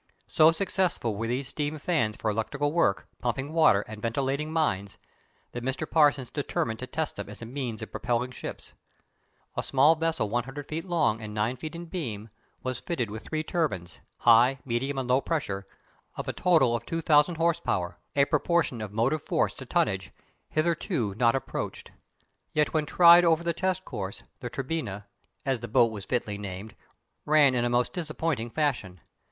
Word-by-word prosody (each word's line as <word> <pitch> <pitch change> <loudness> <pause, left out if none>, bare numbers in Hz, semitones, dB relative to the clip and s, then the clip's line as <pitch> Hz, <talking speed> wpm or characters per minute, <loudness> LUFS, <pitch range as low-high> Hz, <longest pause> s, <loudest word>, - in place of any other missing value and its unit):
So 155 +1 +6
successful 175 - 0
were 115 +3 -3
these 130 +3 -2
steam 150 +1 -2
fans 145 -10 0
for 110 - -1
electrical 145 +7 -1
work, 150 -12 +1
pumping 130 +5 -2
water 155 -12 +5
and 110 0 -9
ventilating 135 +6 -1
mines, 100 -12 0 0.5
that 120 - -6
Mr. 130 +4 -2
Parsons 145 -5 +3
determined 115 -6 -2
to 130 - -5
test 160 +2 -3
them 100 -1 -6
as 105 +2 -9
a - - -5
means 120 -3 -4
of - - -8
propelling 125 +1 -1
ships. - - -7 0.8
A - - 0
small 140 +4 +4
vessel 165 -6 0
100 130 +6 -3
feet 160 +3 -4
long 155 - +1
and 105 -1 -7
9 110 +4 0
feet 155 +6 -7
in 170 +1 -6
beam 115 - -5 0.3
was 130 -1 -2
fitted 125 - -3
with 110 +1 -7
three 155 0 -2
turbines 135 - -2 0.2
high, 120 +3 +5
medium, 135 +3 -1
and 130 -2 -2
low 130 +2 +3
pressure, 100 -13 -2 0.5
of - - -4
a - - -1
total 135 -10 +3
2000 160 +4 +2
horse 165 0 +2
power 90 0 -2 0.2
a 140 -1 +5
proportion 155 -5 +1
of 105 -2 -5
motive 120 +8 +1
force - - 0
to - - -10
tonnage - - 0 0.4
hitherto 155 - 0
not 115 +2 +3
approached. 135 - -4 0.6
Yet 150 -1 +1
when 155 -2 +1
tried 175 +1 +8
over 165 -1 +3
the 170 0 0
test 185 +2 -1
course 100 -6 -5 0.2
the 120 - -5
Turbinia, 125 -8 -4 0.4
as 135 -3 0
the 120 - -6
boat 115 +1 +4
was 100 -3 -7
fitly 105 -5 -2
named, 100 +1 -7 0.5
ran 150 -3 +5
in 120 -1 +1
a - - +1
most 120 0 +1
disappointing 155 -7 -2
fashion. 120 - -1
130 Hz, 175 wpm, -28 LUFS, 115-155 Hz, 0.8 s, tried